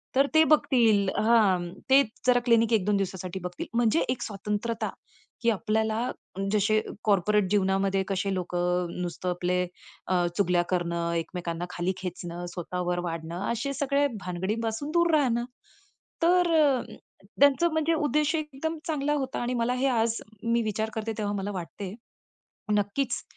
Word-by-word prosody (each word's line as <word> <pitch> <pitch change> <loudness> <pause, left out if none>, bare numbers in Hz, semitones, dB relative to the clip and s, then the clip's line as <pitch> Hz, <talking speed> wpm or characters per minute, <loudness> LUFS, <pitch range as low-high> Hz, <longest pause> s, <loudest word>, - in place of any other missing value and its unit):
तर 275 +1 +4
ते 315 - +8
बघतील 230 -10 +4
हां, 205 -6 +3 0.2
ते 275 +1 +7 0.2
जरा 245 -1 +5
क्लिनिक 230 -1 +4
1-2 205 -1 +2
दिवसासाठी 190 -1 -3
बघतील. 180 0 -5
म्हणजे 230 -7 +3
एक 250 - -1
स्वतंत्रता 210 +2 -3 0.5
की 235 - +3
आपल्याला 220 +1 0 0.5
जसे 215 +1 +3 0.2
कॉर्पोरेट 205 -1 +2
जीवनामध्ये 195 -1 +2
कसे 195 0 -1
लोकं 180 -1 -1
नुसतं, 180 +1 -3
अ, - - +2
आपले 180 +1 0 0.7
चुगल्या 180 -3 +3
करणं, 170 -2 -1
एकमेकांना 170 0 -3
खाली 180 +2 -1
खेचणं, 175 -1 -6
स्वतःवर 180 0 -2
वाढणं 165 +2 -5
असे 255 +5 -2
सगळ्या 285 +1 +1 0.2
भानगडींपासून 220 - -2
दूर 340 0 +3
राहणं. 240 -5 +2 0.8
तर, 355 0 +4
अ, 275 -4 +3 0.6
त्यांचं 285 +4 +5
म्हणजे 315 +1 +2
उद्देश 300 0 +1
एकदम 310 +1 -3
चांगला 295 -2 0
होता 270 -3 -2
आणि 240 +1 -1
मला 235 +1 +1
हे 260 +2 +1
आज 230 -2 +1 0.2
मी 230 0 +2
विचार 220 +1 -1
करते 220 0 -3
तेव्हा 205 -1 -1
मला 200 +1 -3
वाटते, 190 +1 -6 0.8
नक्कीच 205 +7 0
215 Hz, 140 wpm, -27 LUFS, 180-255 Hz, 0.8 s, ते